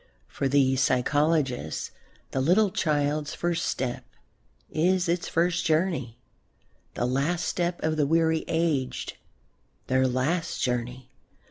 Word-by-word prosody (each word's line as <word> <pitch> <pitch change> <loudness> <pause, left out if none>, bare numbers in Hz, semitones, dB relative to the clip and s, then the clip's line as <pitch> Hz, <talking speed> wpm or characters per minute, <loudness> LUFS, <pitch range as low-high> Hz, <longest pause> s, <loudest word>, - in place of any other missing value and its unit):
For 135 - -2
these 135 -1 +3
psychologists 135 - +1 0.4
the 135 - 0
little 185 +8 +3
child's 150 -2 0
first 170 -1 -1
step 125 -2 -2 0.7
is 180 +3 +2
its 170 +1 0
first 170 +1 +1
journey, 155 -8 0 0.8
the 120 - 0
last 140 +8 0
step 175 -1 -1
of 155 0 0
the 145 -2 +2
weary 160 0 +2
aged 160 -6 -1 0.7
their 130 0 +2
last 135 +7 -1
journey. 125 +1 -2
150 Hz, 115 wpm, -26 LUFS, 130-170 Hz, 0.8 s, these